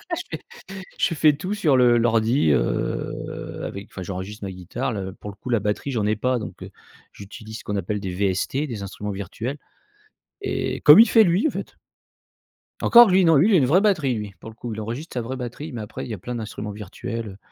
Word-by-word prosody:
Je - - -4 0.2
fais 475 0 -18 0.4
je 165 - +1
fais 150 0 +5
tout 185 +8 -4
sur 160 -10 +3
le 125 -2 +5
l'ordi, 115 - +2
heu, - - -2
avec 100 +1 -6
enfin 95 - -7
j'enregistre 95 +3 -6
ma 95 - -4
guitare 95 +8 -4
le 95 -2 -4
pour 105 - -9
le 100 - -16
coup 125 - -9
la 115 - +2
batterie 105 +7 -2
j'en 110 -5 -1
ai 110 - +2
pas 125 +3 0
donc, 110 - -7
heu, - - -7 0.4
j'utilise 110 +2 -10
ce - - -12
qu'on 105 - -3
appelle 100 +2 -2
des 95 -2 -4
VST, 100 +10 -1
des 110 -6 -5
instruments 105 +2 -6
virtuels 100 +7 -5 0.8
et 400 - -2
comme - - +9
il 235 - +5
fait 225 - +7
lui, 180 - +2
en - - -1
fait. - - -7 1.1
Encore 240 0 +8
lui, 190 +1 +5
non, 165 -2 +5
lui, 170 +11 +5
il - - +3
a - - +7
une 140 - +4
vraie 180 +7 +4
batterie 165 - +2
lui, 105 -2 -5
pour 110 - -9
le 110 - -14
coup. 115 0 -6
Il 110 - -5
enregistre 120 +9 -6
sa 125 - -1
vraie 125 +3 -5
batterie 125 +5 -6
mais 120 -4 -5
après 105 - -7
il - - -9
y - - -3
a - - -10
plein 125 - -6
d'instruments 110 -2 -5
virtuels, 105 +2 -6
heu 95 - -11
115 Hz, 235 wpm, -23 LUFS, 105-140 Hz, 1.1 s, comme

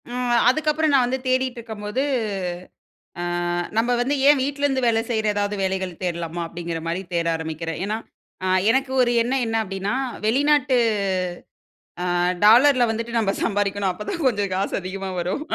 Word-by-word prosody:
ம். 245 0 0
அதுக்கப்புறம் 305 +2 +1
நான் 260 -3 +5
வந்து 260 +2 -1
தேடிட்டுருக்கம்போது, 245 -3 -2 1.2
அ - - -3 0.6
நம்ப 235 +2 +2
வந்து 270 +4 0
ஏன் 290 -2 +6
வீட்லேருந்து 280 -1 0
வேல 225 -1 +2
செய்ற 220 -2 0
ஏதாவது 205 0 -1
வேலைகள் 190 -2 -2
தேடலாமா? 170 -1 -3
அப்டிங்கிற 170 -1 -5
மாரி 175 +3 -2
தேட 170 -1 0
ஆரம்பிக்கிறேன். 160 0 -5
ஏன்னா, 215 +2 -1 0.5
அ - - 0 0.2
எனக்கு 265 +2 +1
ஒரு 240 - +2
எண்ணம் 250 +2 0
என்ன 225 0 -1
அப்டின்னா, 195 +2 -3 0.3
வெளிநாட்டு 270 +1 +3 1.3
அ - - -1 0.4
டாலர்ல 250 +4 +6
வந்துட்டு 230 +1 -3
நம்ம 205 -3 +1
சம்பாரிக்கணும். 200 -2 0
அப்போதான் 295 - -5
கொஞ்சம் 205 -5 0
காசு 195 +2 -1
அதிகமா 190 +1 -5
வரும். 180 +11 -2
225 Hz, 145 wpm, -23 LUFS, 190-260 Hz, 1.3 s, ஏன்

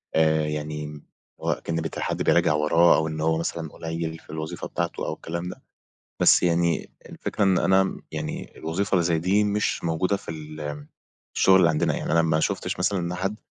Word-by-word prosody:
آآ 80 -1 +3
يعني 75 0 -5 0.4
هو - - 0
أكن 85 - -3
بت 80 -2 -3
حد - - -2
بيراجع - - +4
وراه 80 +3 +5
أو 80 - +1
إن 80 -1 -4
هو 80 0 +2
مثلًا 80 -1 -3
قليّل 80 0 -4
في - - -23
الوظيفة 80 +1 -5
بتاعته 85 0 -3
أو - - -2
الكلام 85 +2 -5
ده، - - -10 0.6
بس - - +6
يعني 85 -1 +1 0.2
الفكرة 105 - -2
إن 95 -2 +4
أنا 95 0 +2
يعني 75 -1 -5
الوظيفة 85 +6 -2
اللي 90 -2 +3
زي 85 -1 +2
دي 95 +5 +2
مش 105 -2 0
موجودة 85 +4 +1
في - - -9
ال 75 -2 -7 0.5
الشُغل 95 - +6
اللي 90 -3 +5
عندنا 75 -1 +1
يعني. - - -3
أنا 85 0 +5
ما 80 -1 +2
شُفتش - - -1
مثلًا 95 +2 +1
إن 85 0 -2
حد 95 +3 -2
80 Hz, 190 wpm, -25 LUFS, 80-90 Hz, 0.6 s, بس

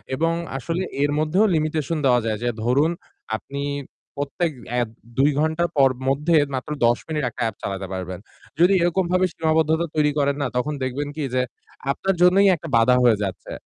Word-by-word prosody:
এবং 165 +3 +1 0.2
আসলে 165 +8 -2 0.2
এর 145 - +2
মধ্যেও 165 +7 +3
limitation 155 0 -1
দেওয়া 125 -2 +5
যায়। 110 -1 -1
যে 120 - +1
ধরুন, 140 +7 +3 0.4
আপনি 140 +6 -6 0.5
প্রত্যেক 145 +4 -2 0.3
app 120 - -2 0.3
২ 140 +3 +4
ঘণ্টা 160 +2 +1
পর 135 -2 +5 0.2
মধ্যে 150 +5 +2 0.2
মাত্র 130 +3 -5
১০ 120 0 +4
মিনিট 155 -2 -2
একটা 120 - -4
app - - -11
চালাতে 95 -1 -4
পারবেন। 95 -1 -5 0.4
যদি 180 +3 +5
এরকমভাবে 180 +1 +2
সীমাবদ্ধতা 160 +1 +1
তৈরি 150 -1 +3
করেন 140 0 +2
না। 140 - +1
তখন 150 +5 -1
দেখবেন 130 +3 -2
কি 155 - -3
যে 130 - +3 0.5
আপনার 195 +6 -1
জন্যই 190 +3 +6
একটা 165 0 -9
বাধা 125 +2 +5
হয়ে 120 -3 +5
যাচ্ছে। 95 -2 -5
150 Hz, 170 wpm, -23 LUFS, 125-165 Hz, 0.5 s, জন্যই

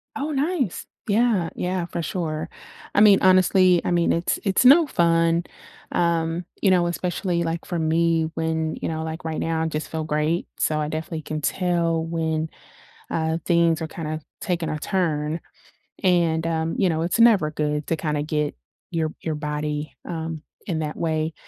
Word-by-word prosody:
Oh, 290 +2 -2
nice. 285 - -1 0.2
Yeah, 210 -5 +2
yeah, 180 -1 -1
for 170 - -4
sure. 160 -2 -3 0.5
I - - +5
mean, 205 -2 +7
honestly, 185 -1 +5
I - - 0
mean, 170 -1 +3
it's 170 +1 0
it's 195 +4 +2
no 300 +5 +8
fun, 165 -4 +2 0.5
um, 170 0 0 0.2
you 195 - +4
know, 175 -2 +3
especially, 175 0 -1
like, 165 0 -2
for 175 - -3
me 165 0 +1
when, 160 -1 -1
you - - -1
know, 160 -1 -3
like, 160 +1 -5
right 160 -1 -2
now, 165 0 -1
I 160 - 0
just 155 -1 -4
feel 160 -1 -3
great, 155 +2 0
so 155 -1 +1
I 150 - -1
definitely 155 +1 -4
can 155 0 -4
tell 170 -1 +1
when, 160 -1 -1 0.6
uh, 160 0 0
things 170 -2 +3
are 160 - -2
kinda 155 -1 -5 0.2
taking 175 -3 -1
a 155 - -2
turn. 160 -3 -1 0.6
And, 170 -3 +2
um, 165 0 -1
you 190 - +3
know, 160 -1 0
it's 175 +7 0
never 210 -10 +5
good 150 -1 -2
to 165 - +1
kinda 150 -1 -1
get 150 -1 -1 0.4
your 160 -2 -1
your 160 - -2
body, 150 0 -3 0.2
um, 160 -2 -4 0.2
in 170 -5 -1
that 155 -1 -3
way. 160 -1 -1
165 Hz, 175 wpm, -23 LUFS, 155-175 Hz, 0.6 s, no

